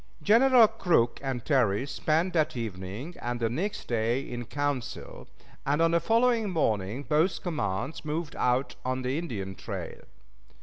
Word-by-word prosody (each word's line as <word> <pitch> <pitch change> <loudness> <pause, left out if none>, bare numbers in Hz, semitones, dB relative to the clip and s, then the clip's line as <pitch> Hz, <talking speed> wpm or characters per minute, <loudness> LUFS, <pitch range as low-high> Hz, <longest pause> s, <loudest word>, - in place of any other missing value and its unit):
Generals 235 - +6
Crook 120 -10 +2
and 130 -4 -3
Terry 125 -5 +2
spent 155 +5 0
that 155 -5 +1
evening 110 - -5
and 120 0 -3
the 115 -1 0
next 190 - -3
day 115 +1 +1
in 120 -2 -6
council, 145 -2 -4 0.4
and 145 +2 +1
on 165 0 +4
the 170 - +4
following 225 +3 +2
morning 110 - 0
both 155 +6 +1
commands 130 - -2
moved 155 +1 -3
out 125 +2 +1
on 130 0 -2
the 130 +4 -1
Indian 100 - -4
trail. - - -7
140 Hz, 145 wpm, -28 LUFS, 120-165 Hz, 0.4 s, Generals